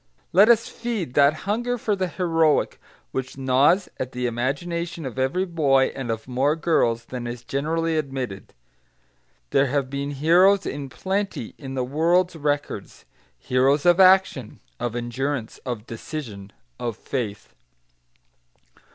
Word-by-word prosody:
Let 200 +6 +7
us 230 -1 +5
feed 225 - -4
that 145 +2 +4
hunger 240 +4 -1
for 215 -2 0
the 190 -1 -1
heroic 165 -4 +1 0.3
which 130 0 -4
gnaws 135 +8 +3
at 130 0 -4
the 125 0 -2
imagination 160 +8 -2
of 130 0 -5
every 135 +9 +1
boy 140 -7 +2
and 135 -3 -5
of 110 +1 -3
more 135 +4 +1
girls 120 -8 +1
than 125 -1 -6
is 120 0 -6
generally 160 +5 -1
admitted. 130 -9 -5 1.0
There 135 +1 +3
have 135 0 -1
been 140 0 -3
heroes 175 +8 +4
in 140 -2 -4
plenty 195 - -3
in 135 -2 -7
the 130 - 0
world's 170 +6 +2
records, 145 -8 -3 0.3
heroes 135 - +2
of 175 +1 +5
action, 185 - +4 0.2
of 120 -1 -3
endurance, 120 +1 -3
of 120 -3 -4
decision, 110 -5 -7 0.3
of 115 -3 -3
faith. 110 -7 -5
140 Hz, 135 wpm, -24 LUFS, 125-170 Hz, 1.0 s, Let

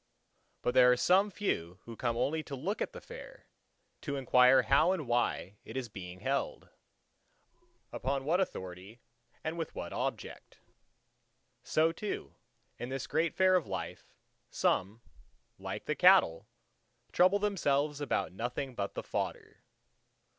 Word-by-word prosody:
But 125 - +1
there 125 -1 +7
are 125 - +3
some 190 +8 +4
few 90 - -2
who 115 - -9
come 115 0 -1
only 150 +6 0
to 140 - -6
look 180 - -3
at - - -1
the - - -9
fair, - - -11 0.6
to 145 - -3
inquire 130 -1 +5
how 145 +10 +4
and 155 -8 -4
why 120 -4 0
it - - -8
is 125 -3 -4
being 90 -2 -9
held, 135 +4 -2 1.2
upon 135 +1 -2
what 170 +5 +2
authority 95 - -5 0.4
and 160 +2 -3
with 165 - -4
what - - -5
object. - - -5 1.0
So 160 +5 +2
too, 205 +4 -5 0.5
in 120 - -5
this 135 -1 -3
great 160 +2 0
Fair 185 0 +4
of 175 -9 +1
life, 95 -4 -6 0.4
some, 105 +5 0 0.6
like - - -6
the - - 0
cattle, 80 0 +5 0.6
trouble 185 +3 +4
themselves 150 -8 0
about 140 -9 -1
nothing 125 +5 -4
but 100 -4 -4
the - - -4
fodder. - - -4
135 Hz, 140 wpm, -32 LUFS, 115-165 Hz, 1.2 s, there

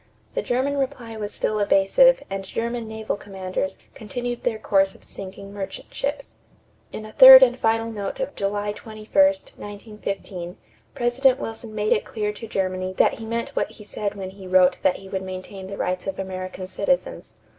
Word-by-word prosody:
The - - -1
German 270 +3 0
reply 255 -4 -3
was 210 -1 -4
still 215 - -1
evasive 210 - +5
and 195 0 -4
German 230 +3 -3
naval 220 0 -3
commanders 190 -2 -4 0.2
continued 240 +2 -5
their 230 -3 -1
course 195 -2 +2
of - - -17
sinking 195 +1 -9
merchant 195 -2 -7
ships. 280 +1 -4 0.5
In 215 - -7
a 215 - -10
third 260 +1 +11
and 245 -1 +4
final 225 -1 0
note 200 -3 -5
of 270 +2 -3
July 205 +1 -1
21, 215 0 -10 0.2
1915, 205 -9 -5 0.4
President 255 +2 +2
Wilson 225 -2 -6
made 210 0 +2
it - - 0
clear 210 -2 -3
to 225 +2 -8
Germany 185 -2 -2
that 190 - +2
he 225 - -7
meant 230 +1 -2
what - - -1
he 210 - -12
said 205 0 -4
when 190 -2 -6
he 190 -1 -11
wrote 185 0 +4
that 185 - +3
he 195 - -12
would 190 0 -3
maintain 190 +1 -7
the 200 +1 -7
rights 180 +1 -2
of 190 - -3
American 185 -1 -5
citizens. - - -2
210 Hz, 175 wpm, -23 LUFS, 195-235 Hz, 0.5 s, third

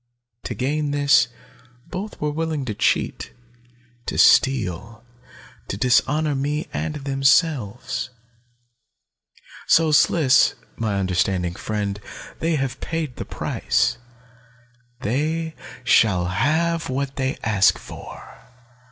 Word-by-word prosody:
To - - -4
gain 145 +3 -1
this, 145 -1 +4 0.6
both 195 +3 -6
were 150 0 -1
willing 155 -2 -2
to 110 - -3
cheat, - - -1 0.7
to - - -3
steal, 115 -2 +3 0.6
to 95 - -4
dishonor 145 +6 +2
me 145 +3 -2
and 155 -2 -3
themselves. 135 - +1 1.6
"So, 160 -1 +4
Sliss, 150 -2 +4 0.2
my 110 -3 -2
understanding 90 -2 0
friend, 105 +1 -3 0.4
they 165 0 0
have 135 -4 -3
paid 160 -6 -3
the - - -5
price, 120 - -1 1.0
they 155 +7 -1 0.3
shall 100 -7 +4
have 160 - 0
what 135 +1 -3
they 130 0 -1
ask 105 -3 +3
for. - - -11
135 Hz, 100 wpm, -22 LUFS, 110-155 Hz, 1.6 s, this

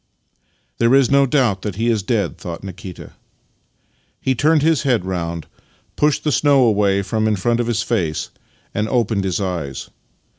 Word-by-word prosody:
" 60 - -44
There 115 +3 +4
is 135 -2 +4
no 140 0 +4
doubt 120 -9 +1
that 105 -3 -4
he 115 +3 -1
is 115 -3 +2
dead," 100 -4 -1
thought 85 0 -7
Nikita. 95 -1 -9 1.1
He 130 - 0
turned 150 +4 +2
his 160 -2 +3
head 125 -9 +1
round, 85 -3 -3 0.5
pushed 150 -1 +1
the 150 - +1
snow 140 -2 +4
away 100 -3 +2
from 110 +3 -1
in 110 - +2
front 115 +5 0
of 120 - 0
his 115 -2 0
face, 90 -10 -2 0.4
and 105 +1 -1
opened 110 -5 0
his 95 0 -1
eyes. 85 -9 -4
110 Hz, 175 wpm, -19 LUFS, 95-125 Hz, 1.1 s, There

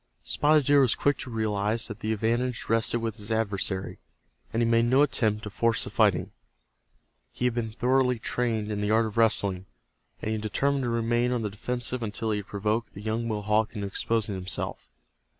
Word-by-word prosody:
Spotted 150 -1 +3
Deer 145 +1 +5
was 125 -4 +3
quick 145 0 +1
to 130 - -6
realize 110 0 0
that 105 -4 -8
the 110 - -2
advantage 115 +3 -1
rested 115 +1 +2
with 115 -1 -3
his 105 0 -6
adversary, 100 -3 -1 0.5
and 115 +1 +1
he - - +2
made 115 0 +3
no 130 +4 +4
attempt 110 -6 +1
to 105 - -6
force 115 +1 +1
the - - -4
fighting. - - +2 1.0
He 125 - -3
had 125 - +2
been 115 -2 -3
thoroughly 125 +1 +2
trained 110 -2 -1
in 105 -1 -2
the 105 - -1
art 110 +1 +3
of 110 - -6
wrestling, 100 -5 +3 0.5
and 110 - -3
he 110 - -1
determined 135 +5 0
to - - -1
remain 120 +1 +1
on 120 -2 -1
the 105 - -2
defensive 120 +3 -2
until 110 0 -2
he 105 - 0
had 105 0 -6
provoked 105 +3 -2
the 100 - -8
young 110 +2 -2
Mohawk 105 +1 0
into 100 -1 -3
exposing 105 +1 -1
himself. 95 -9 -5
115 Hz, 195 wpm, -27 LUFS, 105-120 Hz, 1.0 s, Deer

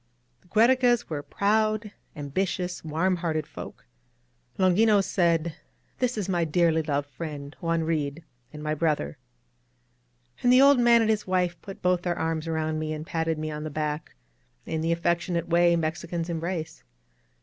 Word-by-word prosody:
The - - -26
Giierecas 240 +3 +3
were 150 -3 -3
proud, 215 +4 0 0.2
ambitious, 180 +5 -2
warm 165 +4 0
hearted 160 -3 -1
folk. - - -10 0.7
Longinos 200 +2 +4
said: 170 -4 +1 0.5
^^This 250 -2 0
is 200 -3 -2
my 175 -3 +1
dearly 165 0 +2
loved 145 -2 -1
friend, 145 0 -7
Juan 165 -1 0
Reed, 155 -1 -2 0.3
and 150 0 -9
my 155 0 -1
brother." 155 -2 -1 1.2
And 245 - +4
the 255 - +7
old 275 -1 +7
man 235 -1 +6
and 220 -1 +3
his 210 -2 -1
wife 180 -2 0
put 195 - -10
both 180 -1 +2
their 175 -1 -2
arms 160 0 -2
around 160 -1 -1
me 155 0 -2
and 155 0 -6
patted 165 -1 -1
me 155 0 -3
on 150 0 -5
the 155 - -4
back, 150 0 -3 0.5
in 160 - -2
the 165 +1 0
affectionate 170 0 0
way 170 0 +4
Mexicans 165 +1 -2
em 165 - -2
brace. 165 -1 -4
170 Hz, 160 wpm, -26 LUFS, 155-190 Hz, 1.2 s, the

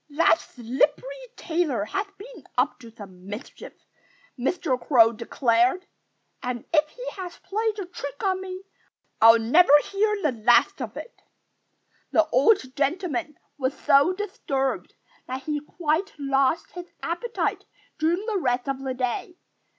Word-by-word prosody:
"That 320 +2 +4
slippery 295 - -2
tailor 315 - -1
has 390 - -2
been 425 - -12
up 250 +2 +1
to 230 - -12
some 195 -5 -13
mischief," 210 +6 -8 0.6
Mr. 270 0 -1
Crow 230 -5 +6
declared. 240 - +1 0.6
"And 250 -2 -4
if 305 -1 +3
he - - -9
has 355 -1 -7
played 435 +1 -1
a 400 - -4
trick 285 -6 -7
on 375 -1 +1
me 375 0 -7 0.6
I'll 225 +1 +9
never 275 +9 +4
hear 420 +1 0
the 300 - +3
last 240 - +3
of - - -5
it." 475 - -10 0.9
The 325 - +4
old 260 - +3
gentleman 315 +1 -1 0.2
was 260 0 -1
so 280 +5 +4
disturbed 330 -9 -3 0.3
that 260 +1 -5
he 300 +1 -2
quite 315 +5 -2
lost 275 +1 +1
his 355 0 -9
appetite 350 +8 -2 0.3
during 340 +6 +1
the 430 -3 -1
rest 250 -3 0
of 270 -1 -2
the 265 -1 -3
day. 255 +7 -3
295 Hz, 140 wpm, -25 LUFS, 255-370 Hz, 0.9 s, I'll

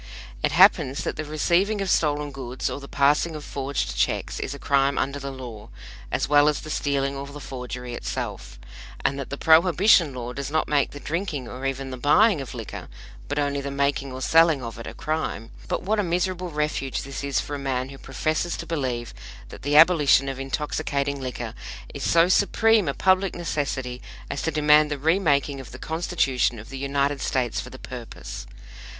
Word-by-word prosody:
It - - +1
happens 135 +2 +5
that - - -2
the 155 - -3
receiving 170 +7 +1
of 195 - -1
stolen 150 -4 +1
goods 130 -2 -4
or - - -4
the 140 - -10
passing 150 +4 +2
of 150 - -7
forged 135 - -3
checks - - -1
is 140 - -4
a - - -8
crime 140 0 +2
under 140 +2 -1
the 140 0 -5
law, 120 -6 -9 0.4
as - - 0
well 145 +1 +5
as 150 - -1
the 155 - -7
stealing 140 -2 0
or 140 0 -6
the 145 +1 -9
forgery 125 -2 -6
itself; 120 - -5 0.5
and 140 0 +1
that 135 - -5
the 140 - -4
Prohibition 170 +1 +5
law 125 0 -5
does 140 0 -4
not 155 +1 0
make 145 -2 +2
the 145 - -9
drinking 155 -5 -3
or 130 +3 -4
even 135 0 -4
the 130 - -5
buying 155 - +4
of 130 -2 -8
liquor, 115 -3 -7 0.4
but - - -3
only 140 -1 0
the 140 - -4
making 140 -1 0
or 130 0 -7
selling 160 -4 +4
of 115 -1 -7
it, 115 - -7
a - - -8
crime; 155 -7 -3 0.2
but - - -2
what 210 +3 +1
a - - +2
miserable 180 +1 -1
refuge 150 -3 -2
this 135 +1 -6
is 140 -2 0
for 145 - -5
a - - -5
man 130 -1 -2
who 135 0 -11
professes 155 +5 -2
to - - -6
believe 125 -7 -3 0.4
that - - -11
the 145 +2 +2
abolition 155 -5 +6
of 135 -1 -4
intoxicating 140 0 -2
liquor 130 -2 -5 0.4
is - - -7
so 165 +1 +4
supreme 210 +1 +3
a 140 - -1
public 190 0 +2
necessity 135 -7 -3 0.3
as 140 - -3
to - - 0
demand 150 -1 +4
the 145 - -2
remaking 145 -3 +2
of 130 - -9
the 130 - -9
Constitution 150 -7 0
of 110 +1 -10
the 135 - -7
United 140 0 0
States 125 -3 0
for - - -9
the - - -10
purpose! - - -8
140 Hz, 200 wpm, -24 LUFS, 135-155 Hz, 0.5 s, abolition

